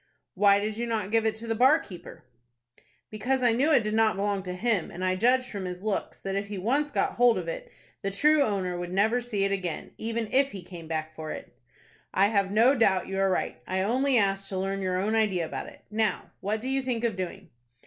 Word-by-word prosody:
"Why 200 Hz, -1 st, +5 dB
did 210 Hz, +1 st, -3 dB
you 235 Hz, +1 st, -2 dB
not 215 Hz, -4 st, -2 dB
give 225 Hz, 0 st, +3 dB
it 220 Hz, -, 0 dB
to 220 Hz, +1 st, -5 dB
the 225 Hz, -, +1 dB
bar 260 Hz, +7 st, +5 dB
keeper?" 180 Hz, -, -11 dB, 0.9 s
"Because 250 Hz, +5 st, -1 dB
I 240 Hz, -2 st, +4 dB
knew 275 Hz, +7 st, +2 dB
it 265 Hz, -6 st, +5 dB
did 215 Hz, 0 st, -2 dB
not 220 Hz, -1 st, +3 dB
belong 200 Hz, 0 st, -1 dB
to 180 Hz, -1 st, -5 dB
him, 210 Hz, -3 st, 0 dB
and 185 Hz, +2 st, -4 dB
I 185 Hz, 0 st, +1 dB
judged 250 Hz, +6 st, +3 dB
from 200 Hz, -3 st, -4 dB
his 180 Hz, +1 st, -6 dB
looks 215 Hz, -2 st, -2 dB
that, 195 Hz, 0 st, -3 dB
if 200 Hz, +1 st, -2 dB
he 205 Hz, -1 st, -5 dB
once 270 Hz, +10 st, +1 dB
got -, -, -1 dB
hold 240 Hz, -1 st, +5 dB
of -, -, -4 dB
it, -, -, -6 dB, 0.3 s
the 195 Hz, -, -1 dB
true 300 Hz, +10 st, +3 dB
owner 195 Hz, -8 st, 0 dB
would 175 Hz, 0 st, -5 dB
never 220 Hz, +6 st, +2 dB
see 220 Hz, -5 st, -1 dB
it 195 Hz, -, +1 dB
again, 185 Hz, -4 st, -3 dB
even 225 Hz, 0 st, -2 dB
if 275 Hz, +1 st, +3 dB
he 190 Hz, -3 st, -7 dB
came 170 Hz, -2 st, -10 dB
back 155 Hz, -1 st, -3 dB
for 155 Hz, 0 st, -7 dB
it." -, -, -8 dB, 0.6 s
"I 195 Hz, +2 st, +4 dB
have 200 Hz, -3 st, +1 dB
no 230 Hz, +6 st, +5 dB
doubt 195 Hz, -9 st, +2 dB
you 195 Hz, 0 st, -2 dB
are 195 Hz, 0 st, +3 dB
right. 185 Hz, -, -2 dB
I 190 Hz, 0 st, 0 dB
only 255 Hz, +5 st, +2 dB
asked 195 Hz, -2 st, +1 dB
to 190 Hz, -, -3 dB
learn 195 Hz, +1 st, -2 dB
your 185 Hz, -1 st, 0 dB
own 205 Hz, +4 st, 0 dB
idea 205 Hz, -6 st, +1 dB
about -, -, -5 dB
it. -, -, -14 dB
Now, 215 Hz, -3 st, -1 dB
what 215 Hz, +2 st, -2 dB
do 255 Hz, -, -5 dB
you 270 Hz, 0 st, 0 dB
think 245 Hz, -3 st, -2 dB
of 230 Hz, -4 st, 0 dB
doing?" 185 Hz, -2 st, -6 dB
210 Hz, 240 wpm, -27 LUFS, 190-235 Hz, 0.9 s, Why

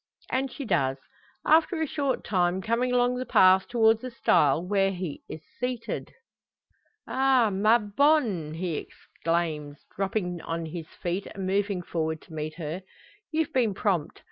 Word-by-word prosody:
And 265 Hz, 0 st, 0 dB
she 280 Hz, -, -6 dB
does, 135 Hz, -, +1 dB, 0.5 s
after 320 Hz, +2 st, +4 dB
a 320 Hz, -, +1 dB
short 280 Hz, -3 st, -1 dB
time; 180 Hz, -2 st, +1 dB
coming 235 Hz, +5 st, 0 dB
along 245 Hz, 0 st, +2 dB
the 255 Hz, -, -3 dB
path 185 Hz, 0 st, +5 dB
towards 225 Hz, -2 st, +3 dB
the 255 Hz, -, -5 dB
stile 155 Hz, -, +2 dB
where 195 Hz, 0 st, +2 dB
here 195 Hz, -, -5 dB, 0.3 s
he -, -, -6 dB
is 155 Hz, -, -13 dB, 0.2 s
seated. 250 Hz, -2 st, -3 dB, 1.0 s
"Ah! 260 Hz, -4 st, +3 dB
ma 215 Hz, +4 st, +4 dB
bonne!" 210 Hz, -, +1 dB
he 170 Hz, -2 st, -2 dB
exclaims, 155 Hz, -4 st, -3 dB
dropping 190 Hz, -3 st, -2 dB
on 165 Hz, 0 st, -4 dB
his 160 Hz, 0 st, -6 dB
feet, 180 Hz, +3 st, -4 dB
and 195 Hz, -1 st, -6 dB
moving 195 Hz, -1 st, 0 dB
forward 160 Hz, -2 st, -2 dB
to 165 Hz, -, -15 dB
meet 155 Hz, 0 st, -4 dB
her. 165 Hz, +2 st, -5 dB, 0.5 s
"You've 315 Hz, -1 st, -1 dB
been 230 Hz, -6 st, +2 dB
prompt! 185 Hz, -7 st, -1 dB
195 Hz, 155 wpm, -27 LUFS, 170-245 Hz, 1.0 s, path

